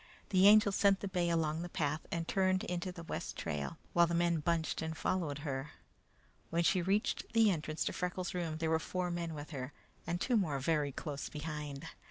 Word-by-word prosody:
The 190 0 +6
Angel 210 -1 +7
sent 195 0 +3
the 200 - -2
bay 180 -2 0
along 160 -1 +1
the 175 - -5
path 155 -2 -2
and 165 -1 -2
turned 185 -1 +2
into 180 +1 -3
the 175 -2 -9
west - - -5
trail, 75 -4 -3 0.2
while 170 0 +5
the 170 - -1
men 170 -1 +2
bunched 165 +1 0
and 160 0 -3
followed 165 -7 -1
her. 135 +1 -3 0.8
When 170 +1 +1
she 185 +2 +3
reached 205 +9 0
the 225 -2 +6
entrance 155 -2 -2
to - - -1
Freckles' 180 0 -2
room, 170 -3 -2
there 160 0 0
were 160 - +3
four 180 +2 -2
men 170 -2 -3
with 145 0 -7
her, 135 -1 -5 0.3
and 170 +1 -1
two 245 +5 +2
more 160 -9 +1
very 145 0 +1
close 145 +1 -5
behind. 150 -1 -5
170 Hz, 205 wpm, -34 LUFS, 155-180 Hz, 0.8 s, Angel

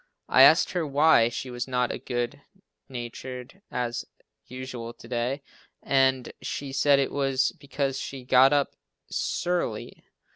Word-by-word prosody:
I - - +5
asked - - +7
her 175 -2 -1
why 145 -5 +4
she 125 +2 -5
was 120 +1 -4
not 125 -1 0
as - - -5
good 120 +3 -3 0.5
natured 125 +5 -7
as 120 -1 -2 0.4
usual 125 -2 -7
to - - -14
day 125 +3 -2 0.4
and 130 -2 +2
she 140 -1 -5
said 140 +1 +4
it 140 - 0
was 135 -2 +1
because 135 -1 -2
she 135 -2 -6
got 130 +2 +6
up 145 -1 +1 0.4
"s'urly." 175 -11 -2
130 Hz, 140 wpm, -26 LUFS, 125-140 Hz, 0.5 s, asked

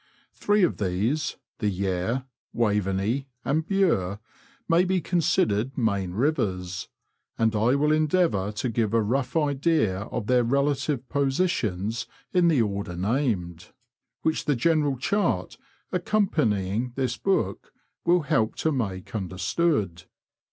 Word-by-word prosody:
Three 205 -1 +2
of 175 - +2
these 110 +11 -1
— - - -56
the 105 - +1
Yare, 95 +6 -1 0.3
Waveney, 105 +3 0 0.2
and 155 +3 0
Bure 155 - +1 0.2
— 275 0 -31
may 170 +1 +4
be 185 0 +1
considered 135 - +1
main 100 -7 0
rivers, 95 - -1 0.5
and 110 -1 +2
I 115 +5 +3
will 150 +2 +2
endeavour 155 - +2
to 120 +4 -2
give 115 -1 0
a 115 - +4
rough 125 +6 -1
idea 145 - +1
of 110 - -4
their 125 +1 +3
relative 140 +1 0
positions 120 - 0 0.3
in 180 -2 +4
the 150 -8 +4
order 100 -3 -3
named, 95 - -1 0.6
whicli 160 - 0
the 145 - +2
general 145 +1 +2
chart 125 - -1 0.3
accompanying 125 - 0
this 130 -2 -1
book 195 -1 -1 0.3
will 175 +1 +4
help 115 -6 +1
to 160 - 0
make 100 -9 -3
under 95 -4 -4
stood. 95 - 0
125 Hz, 130 wpm, -26 LUFS, 100-155 Hz, 0.6 s, may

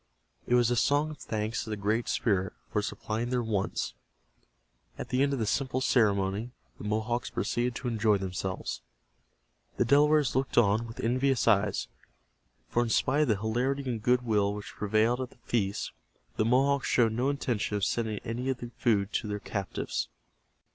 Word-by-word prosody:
It 120 - +3
was 120 -1 +4
a - - +3
song 145 +6 +2
of 150 - -10
thanks 110 +1 -2
to - - -8
the 105 - -2
Great 105 +4 0
Spirit, 95 -4 +1 0.2
for 105 - +1
supplying 110 +3 -3
their 125 -1 0
wants. 105 -3 -1 1.0
At - - -6
the 130 +1 +1
end 140 0 +3
of 140 - 0
the 115 - 0
simple 130 +3 0
ceremony, 105 -3 +2 0.3
the - - -8
Mohawks 110 +3 -1
proceeded 120 0 -1
to 125 - -4
enjoy 110 -3 +2
themselves. 95 0 -4 1.0
The 120 - +3
Delawares 145 +1 +4
looked 135 0 -1
on 110 0 +4
with 115 - -7
envious 130 +1 +1
eyes, 100 - +2 0.8
for 120 - +1
in 120 - 0
spite 135 +6 +2
of 150 - +3
the 110 -4 +2
hilarity 125 +6 -1
and 115 -3 -2
good 125 +2 +3
will 105 -3 +2
which 105 - -8
prevailed 110 +4 +1
at 130 - -4
the - - -21
feast 100 -4 -1 0.4
the 110 - +1
Mohawks 135 +3 +3
showed 115 -3 +3
no 125 +4 +1
intention 120 -7 -1
of 100 - +1
sending 110 -3 -1
any 120 +3 -2
of 130 - 0
the 120 -1 -8
food 105 -3 +2
to - - -1
their 105 0 -2
captives. 100 -2 -3
115 Hz, 180 wpm, -29 LUFS, 105-125 Hz, 1.0 s, was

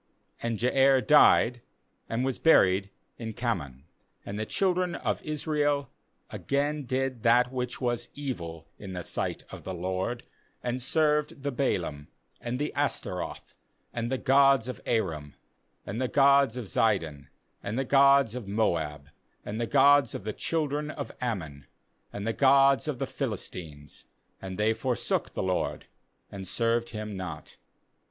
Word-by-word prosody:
5And 115 -1 -2
Jair 135 +2 +3
died, 125 -5 +5 0.5
and 120 +3 -1
was 135 -2 -2
buried 95 - +4 0.3
in 110 -1 -5
Kamon. 70 - -3 0.4
6And 100 - -5
the 110 0 -3
children 180 -2 0
of - - -2
Israel 145 -2 -1 0.4
again 145 +1 -1
did 130 -1 -2
that 120 +2 +4
which 125 -1 -3
was 120 -2 -2
evil 85 - -6
in 95 -2 -8
the 90 -1 -5
sight - - -3
of - - -9
the 95 - -5
LORD, 95 +7 -3 0.4
and 125 +1 -2
served 150 0 +1
the 140 - -1
Baalim, 85 - -2 0.3
and 120 +1 -3
the 150 +2 -2
Ashtaroth, - - -3 0.4
and 120 +1 -3
the 130 - +1
gods 135 -2 +4
of 125 - -6
Aram, 80 -11 -1 0.5
and 110 +5 -4
the 130 - +1
gods 140 -2 +4
of 125 - -4
Zidon, 85 -10 0 0.3
and 105 +4 -4
the 135 - 0
gods 140 -3 +5
of 125 -5 -6
Moab, 80 -9 -1 0.4
and 110 +3 -4
the 115 - -1
gods 140 -2 +5
of - - -6
the 110 +1 -3
children 150 0 -1
of 145 -2 -6
Ammon, 80 - -4 0.4
and 100 0 -6
the 115 - 0
gods 135 0 +4
of 150 -4 -2
the 135 - -2
Philistines; 90 - -6 0.4
and 95 -1 -6
they 105 +2 +2
forsook 125 +1 -2
the - - -1
LORD, 95 -1 -1 0.5
and 95 -1 -7
served 115 +3 0
Him 105 -2 -6
not. 90 -5 -7
120 Hz, 150 wpm, -28 LUFS, 100-140 Hz, 0.5 s, died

